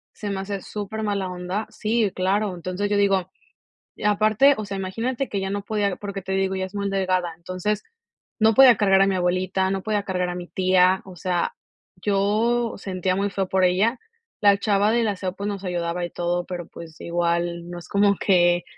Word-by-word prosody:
se 205 -1 -4
me 195 - -3
hace 195 0 -4
súper 215 +1 -5
mala 200 -3 -1
onda. 180 +4 -4
Sí, 215 -2 0
claro, 195 +1 0
entonces, 185 +3 -3
yo 205 - +1
digo 195 -2 +2 0.7
y - - -10
aparte, 215 +6 +4
o 215 - -4
sea, 200 -1 -5
imagínate 230 +8 -2
que 200 - -2
ya 190 - -2
no 200 0 -2
podía, 205 -2 -1
porque 200 -1 -6
te 190 - -6
digo, 190 0 0
ella 190 0 -2
es 190 - -15
muy 200 -1 -1
delgada, 185 -3 0
entonces, 185 +4 -3 0.6
no 220 0 +5
podía 255 -2 +8
cargar 195 -2 +4
a 195 - +5
mi 195 - +1
abuelita, 185 +1 0
no 195 -1 -2
podía 210 -2 0
cargar 180 -2 -1
a 175 - -4
mi 175 0 -6
tía, 185 0 +3
o 190 -2 -11
sea, 180 -1 -1 0.5
yo 215 +4 +1
sentía 185 -1 -2
muy 200 +1 0
feo 195 -1 -2
por 190 0 +2
ella. 210 +7 +2 0.4
La 200 -1 +6
chava 205 0 +2
del 230 -1 +2
aseo, 190 -3 -2
pues, 200 +1 -4
nos 200 -1 -5
ayudaba 175 -1 -2
y - - -6
todo, 175 0 -1
pero, 175 -2 -6
pues, 160 -2 -11
igual 170 0 -1
no 175 0 -6
es 170 - -13
como 200 0 +3
que 175 -2 +3
195 Hz, 205 wpm, -23 LUFS, 180-205 Hz, 0.7 s, podía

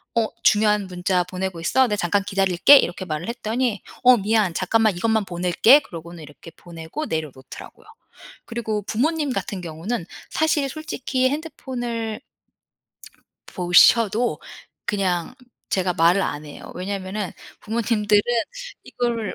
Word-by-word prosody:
어 230 -1 +2 0.2
"중요한 210 -1 +3
문자 180 0 0
보내고 185 -1 -5
있어? 260 +9 +3
나 210 - -1
잠깐 200 +1 0
기다릴게." 195 +6 +5
이렇게 180 -5 -1
말을 155 -1 -4
했더니 235 -1 -2 0.2
"어 250 0 +7
미안. 210 -3 +1
잠깐만 215 +3 +2
이것만 220 +3 0
보낼게." 180 +9 +4
그러고는 170 - -10
이렇게 150 +3 -13
보내고 170 - -8
내려 155 -3 -3
놓더라고요. 130 - -13 0.6
그리고 220 -3 -3
부모님 290 - -1
같은 195 -6 -4
경우는 170 +5 -4 0.2
사실 310 -3 +1
솔직히 265 -3 -2
핸드폰을 245 -7 -4 1.3
보셔도 210 +6 +4 0.5
그냥 185 0 -1 0.4
제가 185 -1 +1
말을 170 +4 +4
안 145 -3 -3
해요. 150 - -11
왜냐하면은 195 +1 -4 0.3
부모님들은 210 -2 +1 0.6
이걸 235 -4 -3
205 Hz, 305 characters per minute, -22 LUFS, 180-235 Hz, 1.3 s, 어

